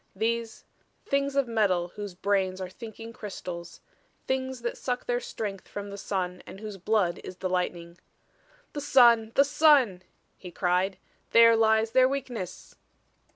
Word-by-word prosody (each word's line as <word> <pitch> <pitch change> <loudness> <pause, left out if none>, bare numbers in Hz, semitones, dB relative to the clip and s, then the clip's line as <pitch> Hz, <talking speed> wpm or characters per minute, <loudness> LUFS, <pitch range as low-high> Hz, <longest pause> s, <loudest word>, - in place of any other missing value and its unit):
These 230 +2 -2 0.4
Things 280 0 0
of 275 -2 +2
metal 195 -6 +1
whose 205 -1 -7
brains 190 -1 0
are 185 -1 -5
thinking 225 +1 -9
crystals 180 -6 -8 0.4
Things 260 -2 -2
that 235 - -2
suck 250 -1 -3
their 245 0 0
strength 205 -5 -6
from 205 0 -7
the - - -6
sun 180 -3 -3
and 195 - -10
whose 210 -2 -7
blood 190 -3 +1
is 185 - -8
the 185 +1 -3
lightning. 175 -1 -3 0.7
"The 290 - -4
sun! 235 -5 +5
The 280 - +6
sun!" 280 - +4 0.4
he 180 - -9
cried. 180 +2 0 0.4
"There 230 0 +8
lies 220 0 +3
their 255 +1 +5
weakness!" 250 -9 -5
220 Hz, 150 wpm, -27 LUFS, 185-245 Hz, 0.7 s, There